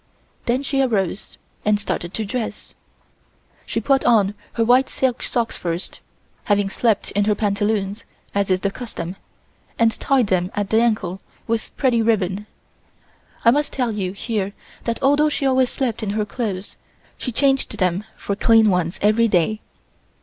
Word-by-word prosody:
Then 250 +3 +1
she 275 -1 +1
arose 210 -6 -1 0.3
and 210 -1 +2
started 175 -4 -3
to 220 - -2
dress. 230 +2 -4 0.9
She - - -1
put 270 -1 +2
on 210 -4 +4 0.2
her 230 - +1
white 255 +3 +4
silk 260 -2 0
socks 235 -2 -1
first, 170 +1 -3 0.5
having 205 -1 +2
slept 225 -2 +1
in 205 0 +1
her 210 0 +2
pantaloons 205 0 -1 0.3
as 200 -1 0
is 185 0 +2
the 200 - 0
custom, 195 -7 -6 0.6
and 230 -1 +4
tied 270 -3 +3
them 185 -2 +1
at 205 -1 -2
the 220 +1 +4
ankle 215 -6 0 0.2
with 225 -1 -3
pretty 250 -4 +3
ribbon. 210 -2 0 1.0
I 230 - +8
must 295 +3 +1
tell 250 -4 0
you 190 -3 -2
here 200 -2 -2 0.3
that 230 -1 -1
although 290 +3 +4
she 290 - -2
always 260 -1 +3
slept 250 -5 -2
in 215 - -2
her 210 - +1
clothes, 205 -3 -4 0.4
she 250 - -4
changed 270 +2 +2
them 185 0 +1
for 200 - -3
clean 225 0 +5
ones 180 0 0
every 215 +3 +4
day. 210 +2 +1
215 Hz, 160 wpm, -21 LUFS, 195-240 Hz, 1.0 s, I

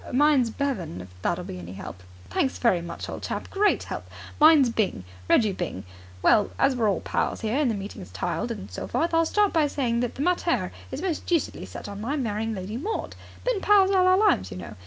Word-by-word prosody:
"Mine's 275 -2 +4
Bevan, 265 - -3
if 90 0 -9
that'll - - -1
be 90 - -7
any 90 +1 -8
help." 95 -1 -8 0.3
"Thanks 265 - 0
very 190 -8 +2
much, 170 0 -6
old - - -6
chap. - - -5
Great 410 +1 +2
help! - - -6 0.3
Mine's 300 -5 +7
Byng. 200 - -1 0.3
Reggie 215 -3 +4
Byng. 175 - -4 0.4
Well, 210 - +5
as 270 - +3
we're 225 -4 +2
all 195 - 0
pals - - -1
here 220 +4 0
and 290 -4 +2
the 225 - 0
meeting's 195 - -7
tiled 90 - -2
and 95 +1 -6
so 90 - -5
forth, 335 +1 0
I'll 330 0 +3
start 415 +2 +2
by 315 -3 +3
saying 245 -5 0
that 245 -1 -2
the 275 - -2
mater 335 - +1 0.2
is 275 +6 -5
most 355 -5 -2
deucedly 340 -4 -1
set - - -8
on 200 0 -7
my 260 +7 -1
marrying 225 -4 -2
Lady 195 +4 -5
Maud. 415 - -3 0.3
Been - - 0
pals 400 -2 +5
all 370 -1 +4
our 370 0 +5
lives, 380 - +3
you 90 - -7
know. 85 -2 -8
245 Hz, 220 wpm, -26 LUFS, 195-320 Hz, 0.4 s, Mine's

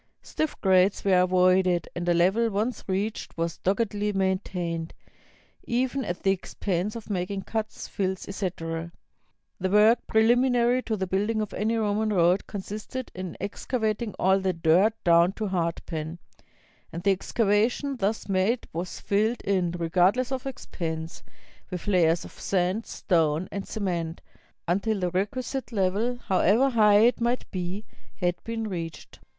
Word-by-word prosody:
Stiff 310 -1 -3
grades 190 0 +3
were 190 -2 +5
avoided, 185 -1 +3
and 175 0 -2
a - - +5
level, 195 +7 +3
once 215 +3 -2
reached, 200 +2 -3
was 165 0 -2
doggedly 205 +1 0
maintained, 185 -4 -2 0.7
even 260 +2 0
at 175 -5 -4
the 195 - +4
expense 195 +1 -2
of 230 - -7
making 190 +1 -2
cuts, 220 +1 -4
fills, 190 -2 -3
etc. 170 -4 -4 0.7
The 190 0 -1
work 210 +4 +5
preliminary 245 +2 +3
to 220 -3 -2
the 190 - -1
building 205 +4 0
of 215 -2 -3
any 220 +3 0
Ro 210 -2 +1
man 215 +1 0
road 180 -1 +3
consisted 210 +5 -6
in 185 -2 -6
excavating 220 0 -2
all 190 +1 +3
the 190 -1 0
dirt 175 +6 +3
down 170 +2 +5
to 215 -1 -3
hardpan, 165 -2 -3 0.7
and 170 +1 -6
the 200 - +4
excavation 225 +7 +1
thus 210 +1 -1
made 195 +5 +1
was 170 +2 -4
filled 215 +4 0
in, 185 -3 +1
regardless 180 +9 +1
of 265 0 -3
expense, 165 -10 -5 0.5
with 180 -2 -5
layers 175 -4 +3
of - - -10
sand, 190 +3 -1
stone, 165 -1 +1
and 200 -1 -5
cement, 175 -5 -3 0.5
until 200 +4 0
the 180 -1 -1
requisite 245 +9 -2
level, 210 +4 0
however 215 +8 +3
high 210 -3 +5
it 240 +1 +3
might 240 +2 0
be, 185 +3 -4 0.3
had 175 -2 -1
been 225 -1 -3
reached. 170 -5 -6
195 Hz, 145 wpm, -26 LUFS, 180-220 Hz, 0.7 s, were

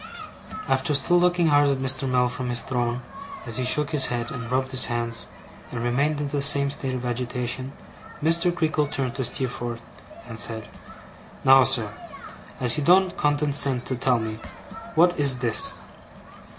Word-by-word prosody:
After 135 +2 0
still 175 +6 +3
looking 175 -2 +2
hard 145 -1 +3
at 140 - 0
Mr. 130 0 -3
Mell 125 -1 +2
from 125 0 -5
his 120 -1 -3
throne, 120 -1 -3 0.4
as 115 0 -6
he 130 - -2
shook 145 +3 +3
his 150 -4 +4
head, 120 -1 -4
and 120 -1 -7
rubbed 130 +1 -1
his 130 -1 +4
hands, 120 -1 -2 0.4
and 115 - -5
remained 140 +5 0
in 145 - -3
the 140 0 -2
same 140 0 +4
state 135 -2 -3
of 125 0 -5
agitation, 125 +1 -4 0.5
Mr. 170 +2 +2
Creakle 160 -4 -1
turned 135 -4 -3
to 130 - -4
Steerforth, 120 -1 -5 0.4
and 115 -1 -7
said: 110 -2 -4 0.8
'Now, 135 0 +6
sir, 115 -5 +1 0.7
as 125 +2 0
he - - -1
don't 185 +4 +3
condescend 145 -3 +2
to 130 - -3
tell 125 0 +1
me, 110 -1 -5 0.6
what 175 +1 +3
is 140 -3 +5
this? 115 -3 +4
130 Hz, 165 wpm, -23 LUFS, 120-145 Hz, 0.8 s, Now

